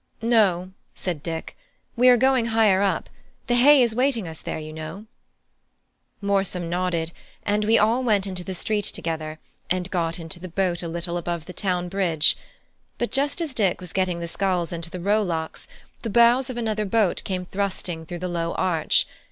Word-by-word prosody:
"No," 195 -6 +3 0.2
said 175 -6 -3
Dick, 165 +1 -5 0.4
"we 250 +1 +6
are 245 - +7
going 260 -1 +3
higher 220 -4 +4
up; 200 - 0 0.4
the 245 - 0
hay 265 +2 +7
is 235 -2 +1
waiting 245 -5 +1
us 160 -1 -6
there, - - -4
you 155 0 -7
know." 160 +7 -7 1.2
Morsom 195 -3 0
nodded, 175 -2 -1 0.3
and 210 +1 +1
we 225 +2 +5
all 230 +5 +3
went 210 -5 +2
into 185 -2 -4
the 190 +1 -5
street 210 +2 0
together, 155 -1 -3 0.3
and 185 0 -1
got 165 -2 0
into 165 +1 -7
the 185 - -7
boat 175 0 0
a 170 - -4
little 170 +1 -2
above 170 -2 -3
the 180 - -9
town 180 -3 -1
bridge. 175 -5 +3 0.6
But 240 - -2
just 285 +5 +1
as 315 -5 -2
Dick 200 -7 +1
was 180 -2 -8
getting 185 -2 0
the 170 - -3
sculls 180 -2 -1
into 165 0 -4
the 180 - -6
rowlocks, 180 -4 -1 0.3
the 230 - -3
bows 235 +4 +5
of 250 - -5
another 215 -2 -1
boat 205 -2 +1
came 185 -2 -3
thrusting 185 -4 -3
through 175 - -5
the - - 0
low 170 -1 -2
arch. 175 -4 +2
185 Hz, 185 wpm, -24 LUFS, 170-220 Hz, 1.2 s, are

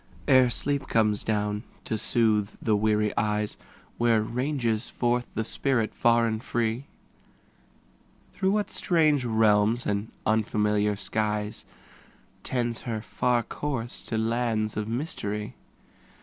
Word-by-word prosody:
Ere 130 -1 +6
sleep 140 +4 -1
comes 105 -2 +2
down 105 -1 -1 0.2
to - - -2
soothe 110 -2 +2
the 110 - +1
weary 105 0 +1
eyes, 105 0 0 0.4
Where 115 -2 +3
ranges 120 -1 -1
forth 120 0 0
the 110 - 0
spirit 120 -3 0
far 115 0 +3
and 110 0 -2
free? 120 +2 -1 1.5
Through 190 0 +1
what 210 -1 0
strange 155 -6 +2
realms 110 0 +3
and 105 +2 -2
unfamiliar 105 -1 +1
skies. 105 +1 -2 0.8
Tends 120 -2 -1
her 110 -3 -4
far 120 -1 +1
course 120 -2 -4
to 115 - -2
lands 110 -1 0
of 105 0 -2
mystery? 105 -5 -3
110 Hz, 120 wpm, -27 LUFS, 105-120 Hz, 1.5 s, Ere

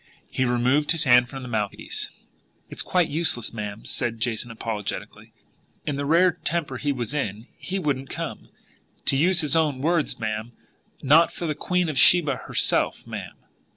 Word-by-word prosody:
He 130 - 0
removed 125 +6 +2
his 165 -1 +2
hand 125 -2 +5
from 135 0 -7
the - - -7
mouthpiece. 110 -4 -3 0.6
"It's - - +1
quite 180 -2 +2
useless, 145 -8 0
ma'am," 105 -1 -6
said 115 -2 -2
Jason 120 0 -1
apologetically. 110 -2 -5 0.5
"In 145 - -1
the 140 0 -3
rare 175 +4 +5
temper 150 -5 -1
he 145 +3 -1
was 120 -3 -3
in, 110 -6 -3
he 190 - -4
wouldn't 140 -6 -2
come, - - -6 0.6
to - - +2
use 175 +6 +4
his 150 -1 +1
own 150 -5 +2
words, 160 +2 0
ma'am, 110 +1 -4 0.5
not 155 +5 +5
for 175 - -6
the 155 - 0
Queen 180 +4 0
of 150 -4 -1
Sheba 150 -5 +5
herself, - - 0
ma'am. - - -7
135 Hz, 165 wpm, -24 LUFS, 120-160 Hz, 0.6 s, hand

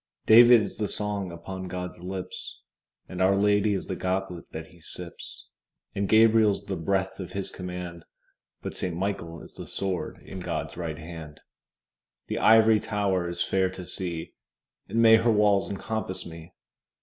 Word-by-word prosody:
David 120 +1 +8
is - - -5
the 105 - 0
song 100 -3 -3
upon 95 +2 -7
God's 90 0 -5
lips, 90 +1 -6 0.5
And 90 0 -5
Our 95 +1 +4
Lady 105 +1 +3
is 95 - -3
the 95 - -4
goblet 90 -2 -2
that 80 0 -6
He 85 - -19
sips: 85 +1 -9 0.5
And 100 0 -2
Gabriel's 110 -2 +5
the 95 - -3
breath 95 +4 -1
of 90 - -7
His 100 -1 -4
command, 90 -2 -7 0.6
But - - -5
Saint 90 -2 -3
Michael 85 -4 -3
is - - -10
the - - -8
sword 95 -2 -3
in 95 - -8
God's 90 - -4
right 80 -3 -4
hand. 80 -2 -9 0.9
The - - -3
Ivory 110 -1 +6
Tower 100 -5 0
is 85 0 -1
fair 95 -1 +1
to 95 -1 -8
see, 85 -3 -5 0.5
And 115 +1 +2
may 115 0 +8
her 115 +1 +3
walls 105 -4 +3
encompass 100 -1 -4
me! 80 -1 -10
95 Hz, 160 wpm, -27 LUFS, 90-105 Hz, 0.9 s, David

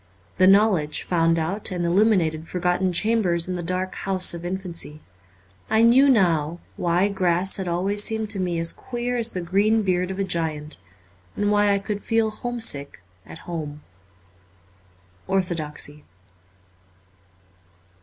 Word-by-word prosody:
The 185 - +6
know 205 +3 +6
ledge 150 -5 -2
found 165 -1 +1
out 180 +6 -2
and 175 -2 -3
illuminated 170 -4 +2
forgotten 180 +1 0
chambers 180 -4 +1
in 185 - -3
the 175 - -4
dark 185 +2 -2
house 190 -2 +1
of 170 0 -7
infancy. 175 -4 -3 0.7
I 220 +1 +3
knew 260 +4 +6
now 170 - +2 0.2
why 175 +3 +1
grass 185 -1 +1
had 190 -2 -4
always 195 +4 0
seemed 220 -1 0
to 200 - -2
me 180 -2 -1
as 165 0 +3
queer 245 0 -4
as 235 -1 +2
the 180 - -3
green 205 +5 +1
beard 180 -1 0
of 190 - -5
a 200 - 0
giant, 155 -4 -3 0.6
and 205 0 0
why 205 0 +3
I 200 - +2
could 205 +1 -4
feel 225 -1 0
home 240 +3 -5
sick 140 - -1 0.2
at 165 - -12
home. 150 -4 -6 1.4
'Orthodoxy.' 155 -5 -2
185 Hz, 145 wpm, -23 LUFS, 170-205 Hz, 1.4 s, The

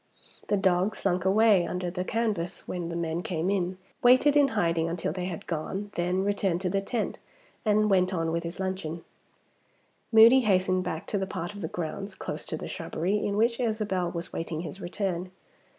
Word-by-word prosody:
The 205 - +2
dog 190 +1 +2
slunk 185 -2 0
away 205 -1 +5
under 180 -1 -3
the 180 0 -2
canvas 205 -5 -2
when 175 -2 -3
the 170 - -4
men 170 0 -2
came 180 +1 -1
in, 185 -2 -1 0.2
waited 255 +4 +6
in 290 -1 +6
hiding 165 -3 +1
until 165 -2 -2
they 180 0 -3
had 180 -3 -5
gone, 190 +5 -4
then 180 +2 0
returned 195 -3 0
to 185 -2 -1
the 195 0 +1
tent, 220 +2 -3 0.4
and 215 -1 +3
went 185 -2 +3
on 165 -3 -1
with 170 +1 0
his 170 +1 -7
luncheon. 185 -4 -3 1.1
Moody 230 +3 +8
hastened 185 -5 +2
back 165 -3 -4
to 205 - -1
the 190 - -2
part 175 0 -4
of 205 - -8
the 160 - -2
grounds 180 +5 -5
(close - - -5
to - - -3
the - - -6
shrubbery) 195 +5 -2
in 200 0 -1
which 230 +2 +2
Isabel 215 -6 0
was 170 0 -5
waiting 165 -1 -3
his 180 +3 -7
return. 185 -1 -3
185 Hz, 190 wpm, -28 LUFS, 175-205 Hz, 1.1 s, Moody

